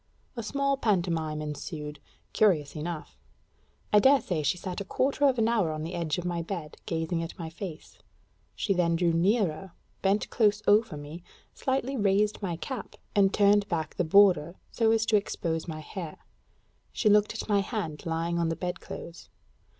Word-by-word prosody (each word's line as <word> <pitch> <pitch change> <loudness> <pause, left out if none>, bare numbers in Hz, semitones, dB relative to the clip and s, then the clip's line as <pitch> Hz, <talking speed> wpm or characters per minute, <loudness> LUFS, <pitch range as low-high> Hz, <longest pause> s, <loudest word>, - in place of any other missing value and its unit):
A 235 - -3
small 275 +5 0
pantomime 165 - 0
ensued, 150 0 -6 0.3
curious 160 -10 +2
enough. 155 +1 -6 0.7
I 210 - +8
dare 270 +5 +6
say 175 -10 -2
she 165 +5 +1
sat 180 +1 -5
a - - -2
quarter 275 +7 +1
of 260 -2 +2
an 225 -1 +3
hour 215 -9 +2
on 155 0 -4
the 165 +3 -5
edge 160 -3 -1
of 180 - -4
my 175 -1 -1
bed, 165 -3 -5
gazing 165 0 -1
at 165 - -6
my 165 -2 -6
face. 170 -2 -8 0.6
She 200 - 0
then 170 -2 +2
drew 170 0 +2
nearer, 190 -1 +1 0.3
bent 200 +2 +1
close 210 -2 +2
over 205 -5 +3
me; 145 +4 -8 0.3
slightly 265 0 -1
raised 205 0 +2
my 180 -4 -2
cap, 245 +6 -6 0.2
and 195 -1 +5
turned 205 0 +4
back 160 -3 -2
the - - 0
border 175 -2 +5 0.2
so 225 -2 +2
as 225 0 +3
to 220 - +4
expose 165 -5 -2
my 155 -2 -5
hair; 165 0 -7 0.7
she 220 - 0
looked 210 +1 +4
at - - -4
my 205 -2 +3
hand 195 -8 -3
lying 165 +1 -1
on 165 -1 +1
the 165 - -1
bed 180 +1 -4
clothes. 170 - -9
180 Hz, 180 wpm, -28 LUFS, 165-210 Hz, 0.7 s, I